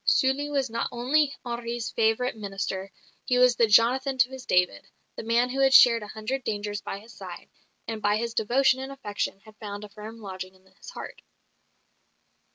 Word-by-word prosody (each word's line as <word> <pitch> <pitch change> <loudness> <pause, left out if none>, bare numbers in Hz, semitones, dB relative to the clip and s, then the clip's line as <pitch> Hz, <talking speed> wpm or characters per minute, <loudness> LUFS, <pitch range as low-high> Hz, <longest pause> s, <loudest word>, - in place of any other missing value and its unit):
Sully 270 +2 +2
was 275 -2 0
not 230 - -2
only 275 +5 +2
Henri's 235 -1 -4
favourite 225 +2 +1
minister; 195 -2 -4 0.3
he 250 - +1
was 250 -1 +5
the 230 - +3
Jonathan 255 +5 +4
to 245 0 +4
his 265 -1 -10
David, 180 - +1 0.3
the - - -5
man 235 +2 +1
who 270 - -3
had 270 -1 +5
shared 235 -2 +8
a 210 - -7
hundred 230 +6 -4
dangers 205 -1 -3
by - - -5
his 220 +4 -14
side, - - -10 0.4
and 220 -1 -4
by 205 0 +2
his 230 +1 -3
devotion 260 +4 +2
and 265 +1 -6
affection 205 -7 -4
had 215 0 -17
found 205 -1 -7
a 210 - -9
firm 215 +2 -10
lodging 185 -2 -8
in 190 0 -25
his 190 - -14
heart. - - -9
230 Hz, 185 wpm, -26 LUFS, 205-255 Hz, 0.4 s, shared